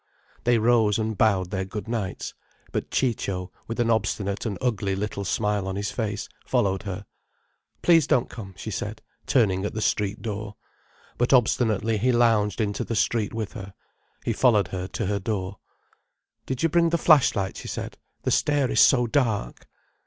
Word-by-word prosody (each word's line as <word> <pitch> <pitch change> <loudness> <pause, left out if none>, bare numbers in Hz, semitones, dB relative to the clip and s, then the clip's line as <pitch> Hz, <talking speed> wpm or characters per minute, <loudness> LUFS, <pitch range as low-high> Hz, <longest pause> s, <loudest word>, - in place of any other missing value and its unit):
They 120 0 +4
rose 110 -2 +3
and 110 -1 -1
bowed 95 -3 +2
their 95 -2 -1
good 100 +3 -6
nights. 110 -5 -3 0.4
But - - -3
Ciccio, 100 -7 -1 0.2
with 115 - -5
an 115 -1 +2
obstinate 100 -1 -1
and 100 -4 -3
ugly 105 -6 0
little 100 0 -3
smile 105 0 0
on 95 - -3
his 100 0 -2
face, 105 -2 -3 0.2
followed 95 -1 +1
her. 95 +2 -5 0.8
"Please 165 -4 +5
don't 125 -3 +2
come," 95 -5 -9
she - - -6
said, - - -5 0.2
turning 95 -7 +2
at 105 - -3
the - - -1
street 105 -1 0
door. 105 -1 -4 0.6
But 120 +2 +2
obstinately 110 -3 +2
he 125 +4 +3
lounged 115 -4 +3
into 105 -2 -1
the 115 - -3
street 110 0 +1
with 110 -3 -4
her. 100 0 -9 0.5
He 115 - +1
followed 105 -6 +3
her 95 0 -4
to 110 - -3
her 100 +1 0
door. 100 -2 -3 0.9
"Did 130 +1 -3
you 165 - +4
bring 170 +1 +3
the 170 - +1
flash 155 -5 +5
light?" 95 -2 -2
she - - -8
said. - - -5 0.2
"The - - 0
stair 145 -3 +2
is - - +2
so 125 -3 +5
dark." 115 -4 -1
105 Hz, 175 wpm, -25 LUFS, 100-120 Hz, 0.9 s, Please